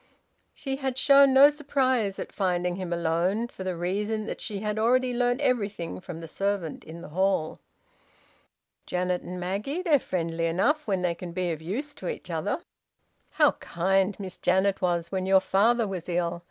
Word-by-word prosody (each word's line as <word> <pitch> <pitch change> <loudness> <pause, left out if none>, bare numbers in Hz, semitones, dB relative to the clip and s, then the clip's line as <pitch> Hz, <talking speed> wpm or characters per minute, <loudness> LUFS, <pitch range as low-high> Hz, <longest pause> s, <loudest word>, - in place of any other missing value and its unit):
She 270 -1 -4
had 265 -2 -3
shown 275 0 +6
no 275 +2 +8
surprise 260 -8 0
at - - -6
finding 180 -2 -1
him 185 -2 -5
alone, 170 +6 0
for 190 - -8
the 185 -1 -2
reason 205 +5 -2
that - - -6
she 205 -3 -5
had 210 0 -2
already 250 +3 +2
learnt 245 +2 +1
everything 205 - -1
from 165 -2 -8
the 165 - -7
servant 195 -2 -2
in 165 +2 -10
the - - -9
hall. 185 -1 0 1.3
"Janet 180 0 -1
and 180 +1 -7
Maggie? 205 - -3
They're 310 -6 +4
friendly 165 -5 -2
enough 280 - +1
when 190 -3 0
they 175 -1 +1
can 170 0 -8
be 180 -1 -1
of 160 -1 -5
use 250 - -4
to - - -8
each 485 - -6
other." - - -2 0.7
"How - - +5
kind 190 +3 0
Miss 190 -3 -7
Janet 190 +2 +2
was 170 -2 0
when 190 -1 -2
your 190 0 +6
father 220 +5 +2
was 185 -3 -5
ill! 170 -1 -1
190 Hz, 180 wpm, -27 LUFS, 175-240 Hz, 1.3 s, no